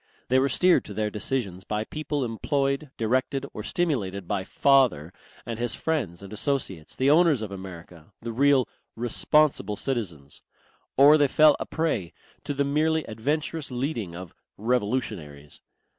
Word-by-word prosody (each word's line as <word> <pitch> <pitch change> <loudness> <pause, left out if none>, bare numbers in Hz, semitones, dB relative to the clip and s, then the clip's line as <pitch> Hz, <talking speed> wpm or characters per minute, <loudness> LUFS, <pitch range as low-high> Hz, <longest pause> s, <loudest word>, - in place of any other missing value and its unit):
They 130 +1 +4
were 135 +1 +2
steered 180 +7 +4
to 105 - -9
their 105 0 -1
decisions 105 -4 -2
by 105 +2 -2
people 150 +1 -3
employed, 140 +5 -1
directed 130 +4 0
or - - -5
stimulated 105 - -1
by 100 -1 -1
"father" 120 - +2 0.3
and 115 -1 -5
his 120 0 -1
friends 115 - -2
and 100 +1 -9
associates, 105 - -3
the 135 +2 +3
owners 155 -7 +4
of 105 - -6
America, 90 -2 -10
the 115 - -5
real 135 +1 +4 0.3
"responsible 120 -1 +1
citizens." 90 - -4 0.6
Or 145 +3 +7
they 145 - +5
fell 150 +2 +5
a - - -4
prey 150 - -2 0.3
to 145 - -3
the 140 +1 +1
merely 155 +2 +1
adventurous 145 +7 -3
leading 120 - -3
of 90 -1 -9 0.2
"revolutionaries." 105 - -2
120 Hz, 145 wpm, -26 LUFS, 100-140 Hz, 0.6 s, Or